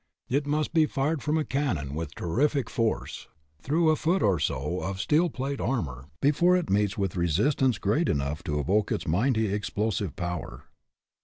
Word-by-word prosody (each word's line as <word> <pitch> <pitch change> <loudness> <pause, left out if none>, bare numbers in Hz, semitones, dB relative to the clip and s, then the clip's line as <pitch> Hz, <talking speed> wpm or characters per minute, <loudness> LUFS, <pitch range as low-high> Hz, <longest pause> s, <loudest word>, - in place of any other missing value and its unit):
It 140 +3 0
must 150 +2 0
be 160 -2 +4
fired 145 +2 -1
from 155 +1 0
a 155 - 0
cannon, 90 - -1
with 80 -1 -5
terrific 135 - 0
force, 115 -2 -2 0.3
through 160 - +2
a - - +3
foot 175 +5 +1
or 95 -5 +3
so 75 +5 -2
of 95 0 -4
steel 160 - +2
plate 135 0 -4
armor, 75 - -2
be 145 - +5
fore 175 +5 +4
it 180 - -2
meets 105 +2 +1
with 95 -3 -1
resistance 105 - +2
great 110 +12 +1
enough 70 +2 -1
to 75 -1 -1
evoke 100 +9 +1
its - - -2
mighty 110 +4 +1
explosive 100 -4 -2
power. 85 -1 -5
110 Hz, 175 wpm, -27 LUFS, 85-145 Hz, 0.3 s, be